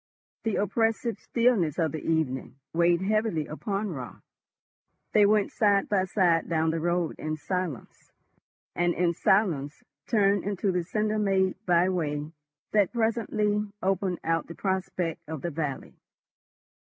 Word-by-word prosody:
The 225 - +1
oppressive 225 +3 0
stillness 230 - +1
of 160 -3 +1
the 155 - -4
evening 130 -6 -1 0.2
weighed 170 +1 +3
heavily 215 -6 +1
upon 200 +5 -3
Raut. 130 -6 -8 0.9
They 210 -1 +6
went 210 -1 +2
side 200 -2 +2
by 190 -2 +2
side 175 -4 +2
down 160 -1 +1
the 165 - -2
road 175 0 -1
in 155 0 -3
silence, 180 -4 -5 0.6
and 175 0 +1
in 175 -1 +2
silence 160 -7 +1 0.2
turned 200 -3 +3
into 200 0 -1
the 180 -1 0
cinder 215 +4 -1
made 190 -2 +1
by 175 0 +4
way 150 -4 -2 0.4
that 205 -3 +3
presently 215 -3 0
opened 190 -1 0
out 165 0 0
the 170 - -9
prospect 185 -4 -2
of 160 -4 -5
the 175 - -2
valley. 150 -3 -4
185 Hz, 140 wpm, -27 LUFS, 165-205 Hz, 0.9 s, They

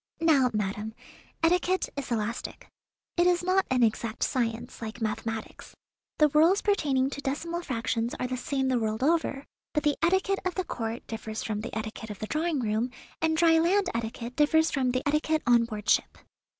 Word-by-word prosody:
Now, 290 -6 +4
madam, 210 +1 -3 0.5
etiquette 360 +2 +2
is 280 -2 -5
elastic. 230 0 -3 0.5
It 345 +1 +4
is 355 -1 +2
not 370 +1 +2
an 255 -1 +3
exact 225 0 0
science, 230 -4 -2
like 225 +1 -6
mathematics. 220 0 -4 0.4
The 300 -1 +5
rules 325 +7 +4
pertaining 280 -10 +2
to 285 - -5
decimal 335 +5 -2
fractions 230 -4 -2
are - - -1
the 255 0 -2
same 265 +1 -1
the 255 -2 +2
world 220 +2 -1
over, 310 -3 +1 0.3
but 300 - +1
the 295 -2 +2
etiquette 380 +3 +2
of 370 -1 -2
the 370 - 0
Court 230 -3 -4
differs 220 -1 -5
from 210 -1 -2
the 225 0 -5
etiquette 220 0 -5
of 210 - -6
the 215 - -4
drawing 310 +3 -1
room, 220 +2 0 0.3
and 320 0 +2
dry 325 -1 +5
land 380 +4 +2
etiquette 230 +1 -4
differs 320 +2 +3
from 260 -3 +1
the 255 +3 -1
etiquette 305 +1 +1
on 240 -1 +5
board 215 -2 -7
ship." - - +2
260 Hz, 180 wpm, -28 LUFS, 225-325 Hz, 0.5 s, The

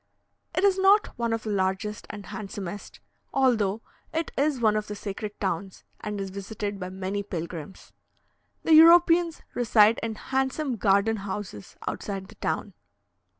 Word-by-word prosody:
It 360 - +1
is 390 -1 +4
not 395 +2 +4
one 235 -1 -1
of 225 -1 -1
the 215 - -3
largest 190 +2 -1
and 205 -2 -8
handsomest, 200 -2 -7 0.3
although 225 -6 +2 0.3
it 325 0 -2
is 285 -1 +1
one 215 -2 +3
of 215 0 -1
the 210 - -5
sacred 205 +1 -6
towns, 190 0 -3 0.2
and 210 -1 -4
is 195 -1 -4
visited 200 +1 -5
by 185 -1 -5
many 190 +2 -3
pilgrims. 170 -3 -7 0.7
The 325 - +4
Europeans 335 +1 +6
reside 225 -2 +4
in 225 -1 -3
handsome 265 +2 -1
garden 200 +2 +3
houses 195 - -6
outside 195 -2 -4
the 220 - -14
town. 205 - -2
210 Hz, 150 wpm, -26 LUFS, 195-260 Hz, 0.7 s, Europeans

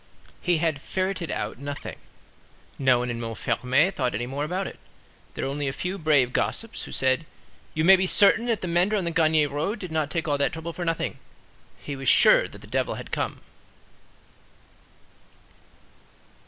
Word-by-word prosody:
He 175 -2 +1
had 155 -3 -1
"ferreted 185 -1 -3
out" 105 +3 -4
nothing. 145 +1 -7 0.8
No 130 -2 +4
one 125 0 -2
in 115 - -5
Montfermeil 125 - 0
thought 125 - -2
any 120 +4 -2
more 135 +3 -4
about 180 +5 -2
it. - - -8 0.6
There - - -3
were 135 - -2
only 145 0 -3
a - - 0
few 180 +7 -4
brave 145 -6 +2
gossips, 225 0 -2
who - - -10
said, 130 +3 +1 0.5
"You 155 - 0
may 190 +2 +9
be 190 0 0
certain 215 +5 +6
that 230 -3 0
the 185 - -3
mender 175 +5 +2
on 195 -4 -1
the 170 - -1
Gagny 160 -3 +3
road 150 +9 -3
did 185 -5 -8
not 155 -2 -1
take 165 +1 -3
all 145 -1 0
that 140 - +1
trouble 165 +1 -6
for 175 - -5
nothing; 165 -1 -2 0.6
he 145 - -6
was 135 -2 +1
sure - - +6
that - - -14
the - - -12
devil - - -2
had - - -9
come." - - -3
155 Hz, 180 wpm, -25 LUFS, 135-180 Hz, 0.8 s, may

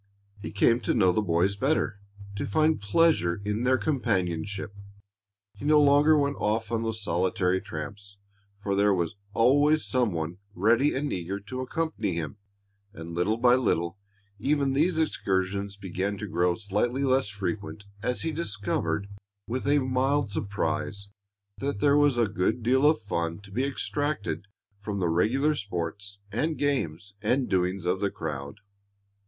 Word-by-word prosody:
He - - -5
came 115 +4 +3
to 110 - -1
know 95 -6 +4
the 100 - +1
boys 90 +1 +1
better, 130 -3 0 0.4
to 100 - -3
find 155 +5 +2
pleasure 100 - +2
in 105 +4 -1
their 130 +1 +4
companionship. 100 - -1 0.8
He - - -13
no 150 +1 +5
longer 145 +2 +5
went 140 -1 +1
off 110 +1 0
on 115 -1 0
those 110 -2 -3
solitary 90 0 +1
tramps, 100 +5 -8 0.4
for 100 -1 -2
there 100 0 +3
was 85 -1 -1 0.2
always 145 +6 +4
some 125 -5 +1
one 85 +2 -4 0.2
ready 115 +9 +3
and 140 +2 -1
eager 95 +2 -3
to 130 +6 -5
accompany 130 - -2
him. 85 +4 -4 0.6
And 85 -3 -8
little 90 +6 +1
by 120 +1 +5
little 95 -7 +1 0.4
even 140 +3 +1
these 160 +5 +2
excursions 100 -9 -1
began 100 +1 -3
to - - -5
grow 85 +1 +1
slightly 110 +6 -1
less 130 -3 +2
frequent 100 +1 -4 0.2
as 125 -3 -1
he 160 - -1
discovered, 100 - -2 0.4
with 130 +4 -3
a 145 +1 +4
mild 130 -2 +1
surprise, 100 0 -2 0.5
that 140 -6 -2
there 145 +4 +4
was 145 -3 +4
a 120 - +4
good 105 +3 -1
deal 130 +5 +4
of 155 - +2
fun 85 -5 -2
to 100 -1 -14
be 125 +7 0
extracted 140 -6 -2 0.3
from 100 0 -4
the 90 -2 +1
regular 125 - +2
sports 100 - -5
and 155 +9 -1
games 100 - -1
and 125 +5 +1
doings 90 0 0
of 90 +2 +1
the 100 - +1
crowd. 70 -5 -6
105 Hz, 155 wpm, -27 LUFS, 95-135 Hz, 0.8 s, no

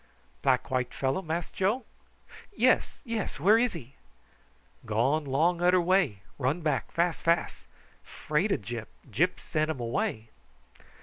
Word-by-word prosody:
"Black 130 -2 +1
white 125 -1 -1
fellow, 135 +7 0
Mass 165 0 -3
Joe?" 215 +6 0 0.7
"Yes, 255 +2 +3
yes, 230 - -3
where 205 +9 +5
is 245 0 +1
he?" 135 -6 -9 0.9
"Gone 125 +8 +1
'long 160 +6 +2
uder 180 +1 +5
way. 175 - +1 0.2
Run 140 +6 0
back 150 -6 -1
fas 170 0 0
fas. 170 0 0 0.4
Fraid 160 +8 -1
o - - +3
Gyp, 110 0 -6 0.2
Gyp - - +1
send 155 0 -1
um 160 - -2
way." 115 -2 -2
155 Hz, 135 wpm, -28 LUFS, 130-180 Hz, 0.9 s, where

